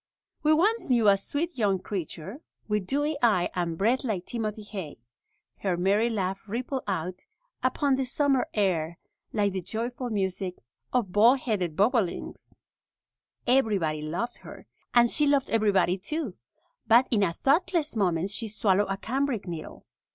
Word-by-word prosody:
We 305 Hz, -, +3 dB
once 405 Hz, +8 st, +2 dB
knew 235 Hz, -4 st, +4 dB
a 200 Hz, -, +7 dB
sweet 295 Hz, -, -2 dB
young 200 Hz, -3 st, +2 dB
creature, 190 Hz, -, -6 dB, 0.3 s
with 210 Hz, -3 st, -1 dB
dewy 290 Hz, +4 st, 0 dB
eye 210 Hz, -7 st, +3 dB
and 170 Hz, -2 st, -2 dB
breath 235 Hz, +8 st, +2 dB
like 205 Hz, -8 st, -2 dB
timothy 215 Hz, -2 st, -4 dB
hay. 195 Hz, -7 st, -7 dB, 0.6 s
Her 185 Hz, -3 st, -1 dB
merry 200 Hz, +6 st, +2 dB
laugh 195 Hz, -2 st, -3 dB
rippled 255 Hz, +4 st, -3 dB
out 180 Hz, -1 st, -3 dB, 0.3 s
upon 265 Hz, +1 st, +1 dB
the 265 Hz, -, 0 dB
summer 270 Hz, 0 st, +1 dB
air 170 Hz, -5 st, 0 dB, 0.3 s
like 205 Hz, -3 st, +1 dB
the 190 Hz, -, -2 dB
joyful 240 Hz, +6 st, -4 dB
music 190 Hz, -3 st, -2 dB, 0.4 s
of 235 Hz, -7 st, 0 dB
baldheaded 210 Hz, -, +3 dB
bobolinks. 205 Hz, -, -1 dB, 0.9 s
Everybody 205 Hz, -, +2 dB
loved 170 Hz, +11 st, -3 dB
her, -, -, -12 dB, 0.3 s
and 240 Hz, -1 st, +6 dB
she 295 Hz, +5 st, +2 dB
loved 280 Hz, -2 st, +2 dB
everybody 195 Hz, -4 st, +2 dB
too. 280 Hz, -, -3 dB, 0.5 s
But 235 Hz, +3 st, +6 dB
in 215 Hz, -4 st, +3 dB
a 180 Hz, -4 st, +2 dB
thoughtless 310 Hz, -, +1 dB
moment 185 Hz, -2 st, +1 dB
she 225 Hz, +2 st, -2 dB
swallowed 205 Hz, -1 st, +1 dB
a 195 Hz, -, -1 dB
cambric 255 Hz, 0 st, -1 dB
needle. 165 Hz, -3 st, -7 dB
215 Hz, 145 wpm, -27 LUFS, 190-255 Hz, 0.9 s, a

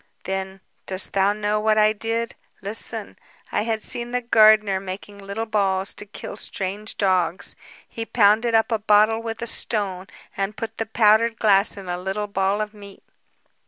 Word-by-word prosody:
"Then, 190 Hz, 0 st, -4 dB, 0.3 s
dost 185 Hz, 0 st, 0 dB
thou 195 Hz, +1 st, +3 dB
know 210 Hz, 0 st, -1 dB
what 215 Hz, 0 st, +2 dB
I 215 Hz, 0 st, +5 dB
did? 230 Hz, +2 st, -2 dB, 0.3 s
Listen. 215 Hz, +1 st, -3 dB, 0.3 s
I -, -, +1 dB
had 220 Hz, 0 st, -2 dB
seen 240 Hz, 0 st, -1 dB
the 250 Hz, 0 st, -1 dB
gardener 215 Hz, -4 st, +5 dB
making 195 Hz, +2 st, -8 dB
little 200 Hz, +3 st, -4 dB
balls 195 Hz, -3 st, 0 dB
to 205 Hz, -, -7 dB
kill 200 Hz, 0 st, -8 dB
strange 205 Hz, +1 st, -4 dB
dogs. 185 Hz, -2 st, +1 dB, 0.3 s
He 230 Hz, -, -6 dB
pounded 225 Hz, +1 st, +3 dB
up 225 Hz, +2 st, +3 dB
a 225 Hz, -, +1 dB
bottle 215 Hz, +1 st, +4 dB
with 230 Hz, 0 st, -5 dB
a -, -, -1 dB
stone 195 Hz, -5 st, -2 dB, 0.3 s
and 195 Hz, +2 st, -3 dB
put 225 Hz, 0 st, -5 dB
the 225 Hz, -, -3 dB
powdered 220 Hz, +1 st, +3 dB
glass 205 Hz, -1 st, +3 dB
in 195 Hz, -2 st, -9 dB
a 175 Hz, 0 st, -3 dB
little 190 Hz, +3 st, -3 dB
ball 200 Hz, +1 st, 0 dB
of 210 Hz, 0 st, -4 dB
meat. 200 Hz, -2 st, -13 dB
210 Hz, 170 wpm, -23 LUFS, 195-220 Hz, 0.3 s, I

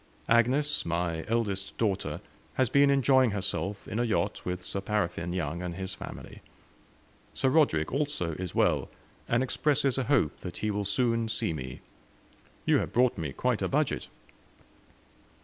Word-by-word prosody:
Agnes, 130 Hz, +6 st, +3 dB
my 85 Hz, -1 st, -1 dB
eldest 105 Hz, -4 st, -1 dB
daughter, 105 Hz, -4 st, -1 dB, 0.3 s
has 130 Hz, -4 st, +2 dB
been 140 Hz, 0 st, +5 dB
enjoying 135 Hz, -2 st, +4 dB
herself 100 Hz, 0 st, -3 dB
in 110 Hz, -, -3 dB
a -, -, +3 dB
yacht, 110 Hz, -3 st, 0 dB
with 90 Hz, 0 st, -3 dB
'Sir 100 Hz, -, -4 dB
Paraffine' 90 Hz, -4 st, -1 dB
Young 85 Hz, -1 st, -2 dB
and 90 Hz, -1 st, -4 dB
his 95 Hz, +1 st, -5 dB
family. -, -, -9 dB, 0.9 s
Sir 130 Hz, -, +2 dB
Roderick, 130 Hz, -, +3 dB
also, 140 Hz, -, 0 dB
is 90 Hz, +2 st, -5 dB
well, -, -, +2 dB, 0.4 s
and 120 Hz, +2 st, +2 dB
expresses 140 Hz, 0 st, +1 dB
a 130 Hz, -, -1 dB
hope 125 Hz, -, +2 dB
that 90 Hz, -, -7 dB
he 110 Hz, -, -1 dB
will 100 Hz, 0 st, -2 dB
soon 115 Hz, +2 st, +1 dB
see 110 Hz, -6 st, -1 dB
me. 65 Hz, -3 st, -6 dB, 0.8 s
You -, -, +4 dB
have -, -, -3 dB
brought 125 Hz, 0 st, +3 dB
me 75 Hz, -4 st, -3 dB
quite -, -, 0 dB
a -, -, +1 dB
budget." -, -, 0 dB
105 Hz, 155 wpm, -29 LUFS, 90-130 Hz, 0.9 s, been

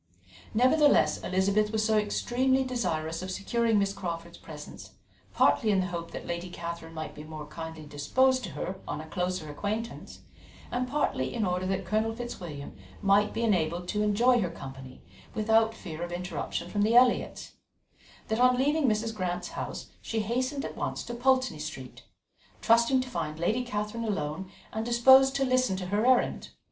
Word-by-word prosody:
Nevertheless, 280 Hz, +5 st, +4 dB
Elizabeth 200 Hz, +3 st, +1 dB
was 215 Hz, -1 st, +1 dB
so 220 Hz, 0 st, +2 dB
extremely 250 Hz, +5 st, +1 dB
desirous 170 Hz, -11 st, -2 dB
of 185 Hz, -, -5 dB
securing 225 Hz, +4 st, +1 dB
Miss 200 Hz, -1 st, +1 dB
Crawford's 170 Hz, -3 st, -6 dB
presence, 150 Hz, -2 st, -10 dB, 0.4 s
partly 220 Hz, -, +3 dB
in 200 Hz, -2 st, +3 dB
the 185 Hz, -, +1 dB
hope 170 Hz, -2 st, -5 dB
that -, -, -7 dB
Lady 175 Hz, +1 st, -4 dB
Catherine 170 Hz, -1 st, -7 dB
might 155 Hz, 0 st, -5 dB
be 150 Hz, -, -9 dB
more 155 Hz, -1 st, -8 dB
kindly 160 Hz, 0 st, -8 dB
disposed 255 Hz, -, +2 dB
to -, -, -6 dB
her 190 Hz, +1 st, -4 dB
on -, -, -3 dB
a 155 Hz, -, -7 dB
closer 180 Hz, -1 st, -2 dB
acquaintance, 215 Hz, +9 st, -5 dB, 0.5 s
and 250 Hz, +1 st, -1 dB
partly 255 Hz, -, 0 dB
in 225 Hz, -3 st, -1 dB
order 180 Hz, 0 st, -1 dB
that 190 Hz, 0 st, -1 dB
Colonel 220 Hz, +4 st, 0 dB
Fitzwilliam 175 Hz, -12 st, -7 dB, 0.3 s
might 200 Hz, +1 st, +4 dB
be 230 Hz, -, -2 dB
enabled 175 Hz, -4 st, +1 dB
to 210 Hz, -, 0 dB
enjoy 235 Hz, +4 st, +4 dB
her 180 Hz, -, 0 dB
company 135 Hz, -5 st, -10 dB, 0.3 s
without 225 Hz, +1 st, +3 dB
fear 160 Hz, -5 st, -8 dB
of 175 Hz, 0 st, -4 dB
interruption 175 Hz, -1 st, -4 dB
from 205 Hz, +3 st, -1 dB
the 220 Hz, +3 st, +3 dB
Elliots, 245 Hz, 0 st, +3 dB, 0.8 s
that 220 Hz, +1 st, -1 dB
on 250 Hz, 0 st, +5 dB
leaving 290 Hz, +2 st, +2 dB
Mrs. 225 Hz, 0 st, 0 dB
Grant's 180 Hz, -3 st, -3 dB
house -, -, -6 dB
she 225 Hz, -1 st, -2 dB
hastened 255 Hz, +6 st, -1 dB
at -, -, -6 dB
once -, -, -3 dB
to 240 Hz, -, -6 dB
Pulteney 255 Hz, -7 st, +2 dB
Street, 150 Hz, -4 st, -8 dB, 0.5 s
trusting 235 Hz, +3 st, +4 dB
to 255 Hz, -, -6 dB
find 155 Hz, -11 st, -4 dB
Lady 220 Hz, +9 st, +1 dB
Catherine 210 Hz, 0 st, -3 dB
alone 185 Hz, -2 st, -3 dB, 0.2 s
and 220 Hz, +1 st, -2 dB
disposed 265 Hz, +3 st, +6 dB
to 275 Hz, -1 st, +2 dB
listen 255 Hz, -5 st, +2 dB
to 185 Hz, -, -4 dB
her 205 Hz, +6 st, +1 dB
errand. 255 Hz, -1 st, +2 dB
210 Hz, 170 wpm, -28 LUFS, 170-240 Hz, 0.8 s, disposed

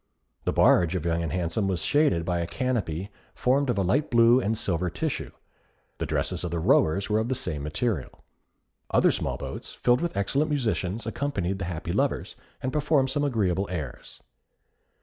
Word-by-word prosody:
The -, -, +2 dB
barge 85 Hz, 0 st, +4 dB
of 85 Hz, -3 st, -2 dB
Young 85 Hz, 0 st, +1 dB
and 80 Hz, -3 st, -3 dB
Handsome 90 Hz, +4 st, -1 dB
was 90 Hz, -4 st, 0 dB
shaded 145 Hz, -, +2 dB
by 90 Hz, -1 st, 0 dB
a 85 Hz, -, -2 dB
canopy 105 Hz, -, -2 dB, 0.2 s
formed 135 Hz, +2 st, +2 dB
of 120 Hz, -, +1 dB
a 100 Hz, -, +2 dB
light 130 Hz, -, +1 dB
blue 120 Hz, 0 st, +6 dB
and 110 Hz, -2 st, -1 dB
silver 90 Hz, -4 st, -1 dB
tissue. 85 Hz, -, -3 dB, 0.7 s
The -, -, -2 dB
dresses -, -, 0 dB
of 90 Hz, -, -2 dB
the 85 Hz, -, -2 dB
rowers 80 Hz, +3 st, +3 dB
were 105 Hz, 0 st, +2 dB
of 110 Hz, -, -1 dB
the 130 Hz, -, 0 dB
same 90 Hz, -, -3 dB
material. 75 Hz, -, -1 dB, 0.8 s
Other -, -, +4 dB
small -, -, -2 dB
boats, -, -, -7 dB
filled 120 Hz, +1 st, +2 dB
with 170 Hz, -8 st, -2 dB
excellent 135 Hz, +10 st, +1 dB
musicians, 115 Hz, -7 st, -1 dB
accompanied 100 Hz, -6 st, -2 dB
the 100 Hz, -, -3 dB
happy 85 Hz, -2 st, -4 dB
lovers, -, -, -1 dB, 0.3 s
and 130 Hz, -, -2 dB
performed 150 Hz, -3 st, +2 dB
some 145 Hz, +2 st, 0 dB
agreeable 100 Hz, -8 st, +1 dB
airs. 75 Hz, -9 st, -6 dB
100 Hz, 180 wpm, -26 LUFS, 85-130 Hz, 0.8 s, blue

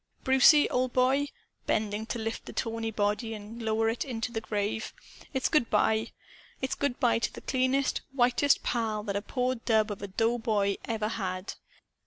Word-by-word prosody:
"Brucie, 265 Hz, +3 st, +6 dB
old 255 Hz, 0 st, 0 dB
boy," 265 Hz, +3 st, +3 dB, 0.4 s
bending 215 Hz, +1 st, -1 dB
to -, -, -3 dB
lift 225 Hz, 0 st, -4 dB
the -, -, -7 dB
tawny 225 Hz, 0 st, -2 dB
body 215 Hz, +2 st, -1 dB
and 215 Hz, +3 st, -9 dB
lower 225 Hz, 0 st, +1 dB
it 225 Hz, +1 st, 0 dB
into 245 Hz, -2 st, -4 dB
the 225 Hz, -2 st, -3 dB
grave, 210 Hz, 0 st, -2 dB, 0.4 s
"it's 265 Hz, -2 st, 0 dB
good 300 Hz, -7 st, +2 dB
by. 220 Hz, +1 st, +2 dB, 0.5 s
It's 265 Hz, -, -2 dB
good 285 Hz, -3 st, -2 dB
by 235 Hz, -2 st, +3 dB
to -, -, -1 dB
the -, -, -10 dB
cleanest, 260 Hz, +1 st, +1 dB
whitest 255 Hz, +2 st, +3 dB
pal 220 Hz, -3 st, -1 dB
that 200 Hz, -2 st, -3 dB
a 200 Hz, -, 0 dB
poor 250 Hz, +3 st, -1 dB
dub 220 Hz, -3 st, +1 dB
of 200 Hz, -, -6 dB
a 200 Hz, -, -4 dB
doughboy 220 Hz, -1 st, +1 dB
ever 220 Hz, -2 st, -1 dB
had. 185 Hz, -3 st, -3 dB
225 Hz, 175 wpm, -29 LUFS, 215-255 Hz, 0.5 s, Brucie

